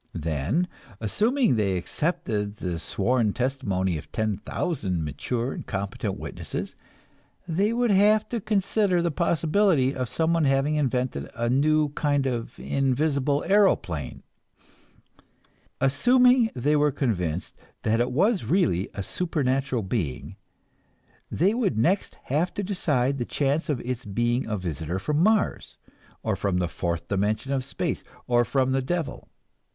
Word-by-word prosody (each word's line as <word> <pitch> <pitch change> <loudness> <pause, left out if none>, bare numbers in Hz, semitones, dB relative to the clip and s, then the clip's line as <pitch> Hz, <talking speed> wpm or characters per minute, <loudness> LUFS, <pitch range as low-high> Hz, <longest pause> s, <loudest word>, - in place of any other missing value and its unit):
Then, 80 - 0 0.3
assuming 215 - +2
they 100 -3 +1
accepted 105 - -2
the 90 -5 -4
sworn 110 +5 +1
testimony 100 - -1
of - - -13
ten 110 -3 -1
thousand 95 - -2
mature 120 - -2
and - - -6
competent 100 -1 -3
witnesses, - - -5 0.7
they 195 +6 +1
would 240 -1 +1
have 210 +2 +4
to 235 -2 -2
consider 200 -2 +1
the 170 - +1
possibility 165 -3 +2
of 130 -3 -3
someone 165 -1 +1
having 135 +2 +2
invented 125 - -1
a 120 +1 0
new 150 +3 +3
kind 145 -1 0
of 120 -3 -3
invisible 140 +1 +1
aeroplane. 140 - +1 1.6
Assuming 245 - +4
they 145 +5 +1
were 150 0 +3
convinced 90 - -2 0.2
that 115 +2 +2
it 120 - 0
was 195 - +2
really 165 - +1
a 100 - -3
supernatural 135 - -1
being, 95 - -3 0.9
they 190 +6 +2
would 220 - 0
next 175 - +1
have 155 +7 0
to 205 - -2
decide 140 -9 0
the - - 0
chances 145 +6 0
of 145 -5 0
its 125 0 -4
being 120 +5 0
a 105 -1 -1
visitor 85 -1 -3
from 150 +10 0
Mars, 215 +2 +1 0.5
or - - 0
from 100 -3 -1
the 90 -1 +1
fourth 85 -1 -3
dimension 105 +6 -1
of 135 -2 0
space, 135 - -3 0.2
or 120 -1 +3
from 130 +1 +1
the 135 0 +1
devil. 165 +3 -3
135 Hz, 135 wpm, -26 LUFS, 105-170 Hz, 1.6 s, have